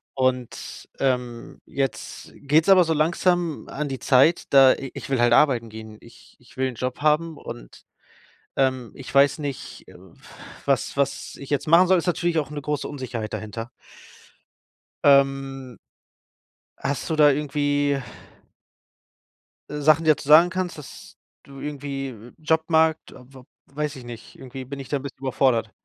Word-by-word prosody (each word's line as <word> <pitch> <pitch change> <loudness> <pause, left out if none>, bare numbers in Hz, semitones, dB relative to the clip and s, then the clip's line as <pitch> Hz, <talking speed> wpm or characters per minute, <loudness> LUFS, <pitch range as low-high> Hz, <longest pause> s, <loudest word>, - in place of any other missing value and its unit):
Und, 130 -2 -3
ähm, 125 -3 -2
jetzt 135 -5 -4
geht's 150 +3 +2
aber 190 -2 +7
so 165 - -2
langsam 170 +1 0
an 150 +1 -4
die 135 -2 -5
Zeit, 135 +6 +4
da 135 -2 +7
i 135 - -7
ich - - -8
will 135 -3 +1
halt 120 0 +4
arbeiten 120 -3 +3
gehen. 110 0 -10
Ich 115 - -18
ich 125 - -21
will 130 0 +1
'n 130 - -6
Job 125 +2 -4
haben 155 +1 +1
und, - - -11 0.7
ähm, 130 -3 0
ich 135 - -10
weiß 140 +1 +5
nicht, 145 -4 -7
äh, - - -15 0.7
was - - 0
was 140 -1 -2
ich 140 - -10
jetzt 145 +1 -1
machen 170 +3 +6
soll. 185 +1 +4
Ist 170 - -3
natürlich 175 -1 0
auch 145 -3 -4
'ne 150 -1 -5
große 150 0 -3
Unsicherheit 125 -6 -5
dahinter. 110 +2 -6 1.3
Ähm 135 -2 +2 1.0
hast 140 - -3
du 160 - 0
da 150 -1 +6
irgendwie 145 -1 0 1.7
Sachen, 150 +2 +3
die 160 - +1
du 155 - +6
dazu - - -10
sagen 160 +4 +7
kannst, 185 -2 -3
dass 150 - -12 0.3
du 135 0 -13
irgendwie, 140 -2 -5
äh 120 0 -13
Jobmarkt. 160 0 +1
Ob 125 +2 -16
ob 130 -1 -14 0.3
weiß 150 -1 -2
ich 130 - -10
nicht. 120 -2 -11
Irgendwie 130 0 -9
bin 140 +2 -7
ich 135 - -9
da 145 - 0
'n - - -8
bisschen 140 -2 -8
überfordert. 130 -4 +1
140 Hz, 165 wpm, -23 LUFS, 130-150 Hz, 1.7 s, aber